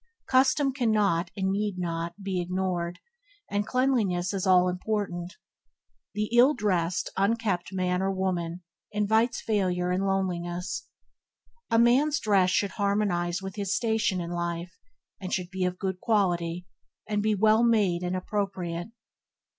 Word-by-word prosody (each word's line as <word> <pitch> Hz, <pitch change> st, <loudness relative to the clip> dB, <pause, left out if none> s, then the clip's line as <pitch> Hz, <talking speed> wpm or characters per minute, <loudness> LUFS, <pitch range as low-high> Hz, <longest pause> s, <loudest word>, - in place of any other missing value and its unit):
Custom 265 Hz, +1 st, +3 dB
cannot, 210 Hz, -, +1 dB
and 190 Hz, 0 st, 0 dB
need 205 Hz, -1 st, -1 dB
not, 170 Hz, +2 st, -4 dB
be 190 Hz, -2 st, -1 dB
ignored; 180 Hz, -1 st, -2 dB, 0.5 s
and 205 Hz, 0 st, 0 dB
cleanliness 215 Hz, -9 st, +1 dB
is 195 Hz, -1 st, -2 dB
all 180 Hz, -1 st, +5 dB
important. 180 Hz, -1 st, -3 dB, 0.8 s
The 210 Hz, +2 st, -2 dB
ill 255 Hz, +5 st, +6 dB
dressed, 185 Hz, -6 st, 0 dB
unkempt 200 Hz, -3 st, 0 dB
man 180 Hz, -1 st, 0 dB
or 195 Hz, 0 st, +1 dB
woman 180 Hz, -2 st, -2 dB, 0.3 s
invites 220 Hz, +3 st, +1 dB
failure 180 Hz, -5 st, 0 dB
and 190 Hz, +2 st, 0 dB
loneliness. 180 Hz, -2 st, -2 dB, 0.8 s
A 230 Hz, -, +3 dB
man's 265 Hz, +6 st, +4 dB
dress 195 Hz, -3 st, +3 dB
should 195 Hz, +1 st, +1 dB
harmonize 200 Hz, -4 st, 0 dB
with 190 Hz, +2 st, -7 dB
his 200 Hz, -2 st, -1 dB
station 220 Hz, -4 st, +1 dB
in 170 Hz, 0 st, -4 dB
life, 170 Hz, 0 st, -3 dB, 0.4 s
and 185 Hz, -, -5 dB
it -, -, +2 dB
should 180 Hz, -1 st, -4 dB
be 190 Hz, -1 st, -1 dB
of 180 Hz, 0 st, -2 dB
good 190 Hz, -1 st, -3 dB
quality, 180 Hz, -5 st, 0 dB, 0.4 s
and 210 Hz, -1 st, 0 dB
be 215 Hz, 0 st, +1 dB
well 215 Hz, +2 st, +4 dB
made 210 Hz, -7 st, +3 dB
and 180 Hz, 0 st, -2 dB
appropriate. 185 Hz, -3 st, -3 dB
190 Hz, 140 wpm, -27 LUFS, 180-210 Hz, 0.8 s, ill